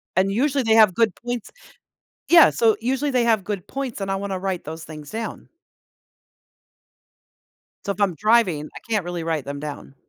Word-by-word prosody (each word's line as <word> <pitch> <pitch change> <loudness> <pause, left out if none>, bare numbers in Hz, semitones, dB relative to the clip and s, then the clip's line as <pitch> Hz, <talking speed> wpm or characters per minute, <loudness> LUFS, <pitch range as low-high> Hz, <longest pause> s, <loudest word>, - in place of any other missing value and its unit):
and 190 +2 +2
usually 270 +4 +1
they 225 -1 +3
have 215 -4 +6
good 220 -1 +1
points 240 -2 -5 0.8
Yeah, 340 -2 +8
so 225 -2 +3
usually 265 +4 0
they 250 -2 +2
have 225 -4 +2
good 200 -3 -4
points, 270 -5 -5
and 195 - -2
I - - 0
wanna 195 -1 -3
write 190 -2 -3
those 160 +2 -7
things 150 -2 -10
down. 225 0 -6 2.4
So, 200 - 0
if 200 - -7
I'm 195 -4 +1
driving, 200 -7 +2
I - - -7
can't 215 -5 +1
really 175 -1 -4
write 160 -3 -1
them 140 +1 -6
down. 145 -2 -8
200 Hz, 180 wpm, -22 LUFS, 175-230 Hz, 2.4 s, Yeah